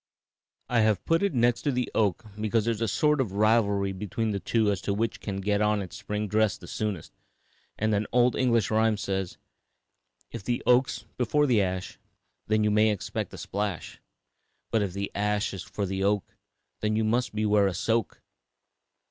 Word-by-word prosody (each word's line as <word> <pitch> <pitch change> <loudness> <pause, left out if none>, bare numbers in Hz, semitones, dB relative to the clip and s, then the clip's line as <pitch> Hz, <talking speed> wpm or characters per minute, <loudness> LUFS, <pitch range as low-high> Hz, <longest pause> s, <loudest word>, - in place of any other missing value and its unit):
I 120 - +2
have 110 -3 +2
put 165 0 +2
it 200 -7 0
next 120 0 +2
to 145 - 0
the 125 -2 -2
oak 105 -1 +1
because 110 0 +1
there 115 - +2
is 110 - -8
a 115 - +1
sort 150 +8 +2
of 105 -7 -3
rivalry 100 -2 +2
between 105 +3 -3
the 100 - -2
two 110 0 +1
as 100 -2 -2
to 100 - -1
which 115 +2 -1
can 95 -2 -4
get 105 +1 +1
on 105 0 +2
its 95 -3 -6
spring 105 0 -3
dress 110 0 +1
the - - -13
soonest, 105 -7 -4 0.6
and 110 0 +1
an 105 +1 0
old 125 0 +3
English 115 -6 +2
rhyme 110 0 +3
says, 95 -2 -3 0.9
"'If - - -7
the 120 +2 -2
oak's 125 +1 +2
before 145 +5 +2
the 120 -7 +3
ash, 95 -1 -3 0.5
Then 110 0 +2
you 105 - +2
may 105 +1 +4
expect 105 -3 -3
a - - -10
splash; 100 -3 -4 0.7
But 110 - +2
if 100 -3 -2
the 100 0 -3
ash 105 0 0
is 95 - -5
'fore 100 +2 -4
the 95 0 -2
oak, 100 0 0 0.4
Then 110 0 0
you 110 - +1
must 120 +1 0
beware 105 -2 +3
a 95 - -1
soak.'" 115 0 -1
105 Hz, 190 wpm, -27 LUFS, 100-115 Hz, 0.9 s, may